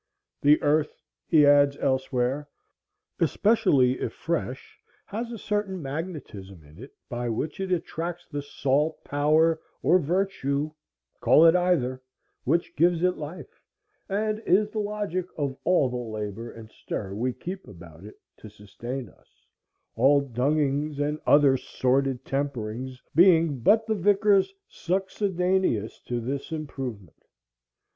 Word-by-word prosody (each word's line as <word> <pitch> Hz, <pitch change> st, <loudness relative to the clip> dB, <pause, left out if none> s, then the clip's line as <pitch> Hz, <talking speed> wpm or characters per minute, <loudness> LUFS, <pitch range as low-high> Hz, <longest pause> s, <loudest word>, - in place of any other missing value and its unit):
"The 150 Hz, +1 st, +5 dB
earth," 150 Hz, +1 st, +1 dB, 0.3 s
he 155 Hz, -3 st, +5 dB
adds 145 Hz, 0 st, +5 dB
elsewhere, 130 Hz, +1 st, -1 dB, 0.7 s
"especially 140 Hz, -, +3 dB
if -, -, -3 dB
fresh, 155 Hz, -6 st, -4 dB, 0.2 s
has 230 Hz, +4 st, -5 dB
a 230 Hz, -, -5 dB
certain 205 Hz, -2 st, -2 dB
magnetism 135 Hz, -, -7 dB
in 75 Hz, +4 st, -17 dB
it, 135 Hz, -, -11 dB, 0.2 s
by 120 Hz, 0 st, -3 dB
which 145 Hz, +9 st, -3 dB
it 190 Hz, -1 st, -3 dB
attracts 175 Hz, 0 st, -3 dB
the 145 Hz, -2 st, -4 dB
salt, 145 Hz, +2 st, -1 dB
power, 155 Hz, +3 st, +2 dB, 0.2 s
or 180 Hz, -, +5 dB
virtue 155 Hz, -4 st, -1 dB, 0.5 s
(call 160 Hz, -, +6 dB
it 165 Hz, +1 st, +7 dB
either) 155 Hz, -8 st, +1 dB, 0.4 s
which 165 Hz, +6 st, 0 dB
gives 170 Hz, +2 st, +2 dB
it 180 Hz, 0 st, +2 dB
life, 155 Hz, +4 st, -9 dB, 0.5 s
and 215 Hz, +2 st, -1 dB
is 210 Hz, +3 st, +3 dB
the 220 Hz, -, -3 dB
logic 205 Hz, -4 st, -2 dB
of 140 Hz, -3 st, -2 dB
all 180 Hz, -7 st, +3 dB
the 125 Hz, -, -3 dB
labor 110 Hz, -1 st, -5 dB
and 110 Hz, -1 st, -12 dB
stir 95 Hz, -2 st, -6 dB
we 120 Hz, +5 st, -1 dB
keep 185 Hz, +9 st, -7 dB
about 85 Hz, -3 st, -13 dB
it, 105 Hz, -, -13 dB, 0.2 s
to 110 Hz, -, -12 dB
sustain 120 Hz, +5 st, -7 dB
us; -, -, -25 dB, 0.5 s
all 135 Hz, +5 st, +5 dB
dungings 140 Hz, +3 st, 0 dB
and 150 Hz, +1 st, -1 dB
other 140 Hz, -2 st, +5 dB
sordid 130 Hz, 0 st, 0 dB
temperings 130 Hz, -2 st, -4 dB
being 165 Hz, -4 st, +5 dB
but 215 Hz, -, +4 dB
the 220 Hz, -, 0 dB
vicars 200 Hz, 0 st, +3 dB, 0.2 s
succedaneous 185 Hz, -, -1 dB
to 120 Hz, -1 st, -2 dB
this 135 Hz, +6 st, -4 dB
improvement." 130 Hz, -, -6 dB
145 Hz, 130 wpm, -26 LUFS, 125-180 Hz, 0.7 s, it